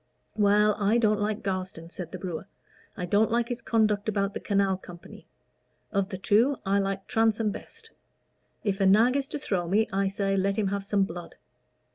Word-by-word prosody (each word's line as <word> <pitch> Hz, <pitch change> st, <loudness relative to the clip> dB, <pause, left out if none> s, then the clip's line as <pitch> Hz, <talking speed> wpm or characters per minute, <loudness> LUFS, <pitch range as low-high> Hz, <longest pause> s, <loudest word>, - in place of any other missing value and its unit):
"Well, 210 Hz, 0 st, +4 dB
I 210 Hz, +3 st, +3 dB
don't 215 Hz, -3 st, +2 dB
like 210 Hz, +1 st, -2 dB
Garstin," 185 Hz, -3 st, -4 dB
said 175 Hz, -3 st, -7 dB
the 185 Hz, -, -5 dB
brewer. 180 Hz, 0 st, -5 dB, 0.5 s
"I 180 Hz, -, -3 dB
didn't 205 Hz, +5 st, +3 dB
like 235 Hz, 0 st, 0 dB
his 245 Hz, 0 st, -3 dB
conduct 220 Hz, -2 st, +1 dB
about 200 Hz, -1 st, 0 dB
the -, -, -4 dB
Canal 195 Hz, -2 st, +1 dB
Company. 175 Hz, -2 st, -13 dB, 0.6 s
Of 200 Hz, -1 st, 0 dB
the 190 Hz, -, -5 dB
two, 230 Hz, +8 st, +3 dB
I 200 Hz, +1 st, +2 dB
like 195 Hz, 0 st, -2 dB
Transome 225 Hz, -1 st, +1 dB
best. 450 Hz, -, -10 dB, 0.7 s
If 200 Hz, -2 st, -1 dB
a 195 Hz, -, +4 dB
nag 225 Hz, +6 st, +5 dB
is 275 Hz, -1 st, 0 dB
to 300 Hz, -, -4 dB
throw 185 Hz, -10 st, -2 dB
me, 215 Hz, +4 st, +3 dB
I 195 Hz, 0 st, +1 dB
say, 195 Hz, 0 st, -1 dB
let 195 Hz, +1 st, 0 dB
him 205 Hz, -3 st, +1 dB
have 200 Hz, 0 st, -2 dB
some 200 Hz, 0 st, +1 dB
blood." 175 Hz, -2 st, -7 dB
200 Hz, 190 wpm, -27 LUFS, 195-220 Hz, 0.7 s, nag